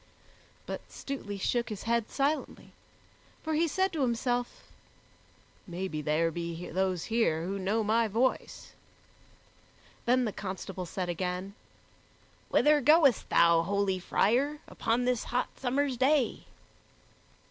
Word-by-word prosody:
But - - -5
Stutely 230 -8 -6
shook 235 +5 -1
his 210 -3 -6
head 230 -1 0
silently, 290 +3 -2 0.7
for 315 - -2
he 325 +2 +2
said 380 +4 0
to 315 - -2
himself, 245 0 -1 1.0
"Maybe 175 -3 -4
there 155 +3 +1
be 170 +1 -5
those 185 -1 0
here 220 -8 +1
who 195 +2 -3
know 205 +4 0
my 225 +2 +2
voice." 235 +5 -1 1.3
Then 250 +1 +3
the 215 - -1
constable 190 -1 -6
said 180 +1 -3
again, 180 +2 -3 1.0
"Whither 295 0 +4
goest 295 - +4
thou, 170 -1 +5
holy 195 +1 0
friar, 255 +11 +1
upon 240 +2 -1
this 250 -2 0
hot 250 +1 -2
summer's 270 0 0
day?" 265 0 +2
225 Hz, 120 wpm, -30 LUFS, 185-255 Hz, 1.3 s, thou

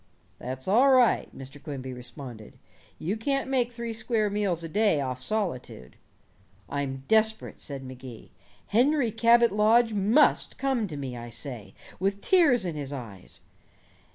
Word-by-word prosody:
"That's 130 +1 -6
all 240 +8 +5
right," 255 -3 +4
Mr. 135 +2 -10
Quimby 135 -3 -6
responded, 125 -2 -9 0.4
"you 185 +6 -2
can't 275 +5 -1
make 250 -3 0
three 235 -1 -5
square 220 -2 -1
meals 195 -5 -1
a - - -4
day 200 -2 +2
off 130 -2 -3
solitude." 130 - -4 0.7
"I'm 135 -2 -4
desperate," 220 0 +2
said 140 -2 -5
Magee. 130 -2 -10 0.4
"Henry 250 +2 +3
Cabot 235 +1 +4
Lodge 220 +3 +4
must 210 +9 +3
come 265 -6 0
to 155 -5 -7
me, 135 -3 -5
I 120 0 -8
say, 120 -3 -7 0.2
with 195 +2 0
tears 285 - +3
in 170 -3 -3
his 145 -2 -4
eyes. 110 -9 -9
195 Hz, 145 wpm, -27 LUFS, -, 0.7 s, all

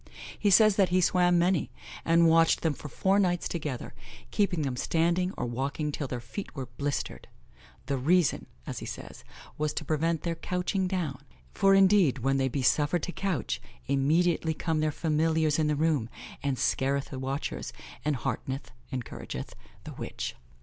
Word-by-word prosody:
He 205 - +3
says 215 +1 +6
that 195 -3 +4
he 180 +1 +3
swam 180 0 +4
many, 175 -3 +2 0.3
and 165 0 +5
watched 165 0 +4
them 160 -2 +1
for 150 - -9
four 195 +7 +2
nights 175 -3 +1
together, 150 -7 -4 0.4
keeping 190 -6 +1
them 135 -3 -2
standing 170 +7 +1
or - - -1
walking 135 +5 -2
till 145 -1 -3
their 125 -1 -4
feet 140 - -7
were 135 -3 -4
blistered; 140 +3 -4 0.6
"the 140 -1 -1
reason" 165 +2 +2 0.2
as - - -5
he - - -7
says, - - -8 0.4
"was 150 0 0
to 155 - -3
prevent 160 +1 0
their 170 - 0
couching 180 +3 -1
down; 170 -8 -2 0.3
for 195 0 +4
indeed, 190 -7 +5
when 135 +2 +1
they 135 -1 +2
be 135 +1 -2
suffered 150 +5 +2
to - - -2
couch, 165 - -2 0.2
immediately 160 +3 +2
come 160 -1 -1
their 155 0 +1
familiars 160 0 +1
in 155 - +2
the 150 - +1
room, 145 -6 +1 0.3
and 140 -2 -1
scareth 135 +2 0
the 130 - -5
watchers, 135 +2 -3 0.3
and 150 -1 +1
heartneth 135 +1 -4 0.2
(encourageth) 120 - -6 0.3
the - - -8
witch." - - -5
155 Hz, 170 wpm, -29 LUFS, 140-175 Hz, 0.6 s, says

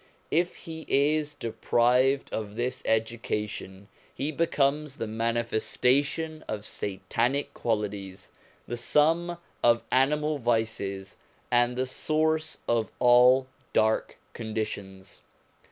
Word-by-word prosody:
If 175 +3 +1
he 160 -1 -8
is 150 +1 +2
deprived 125 +2 +1
of 105 -1 -4
this 120 +2 -2
education 105 -3 -2 0.3
he 145 - -2
becomes 150 -2 0
the 115 - -2
manifestation 120 +7 0
of 105 -1 -4
satanic 115 +9 -1
qualities, 105 -4 -3 0.4
the 120 - -4
sum 165 +7 +2 0.3
of 115 0 +4
animal 150 +3 +2
vices, 110 -5 -1 0.3
and 120 0 +3
the 130 +1 0
source 155 +3 0
of 115 -2 +1
all 125 +1 +6 0.3
dark 110 0 +1 0.2
conditions. 100 -4 -5
120 Hz, 100 wpm, -27 LUFS, 110-145 Hz, 0.4 s, all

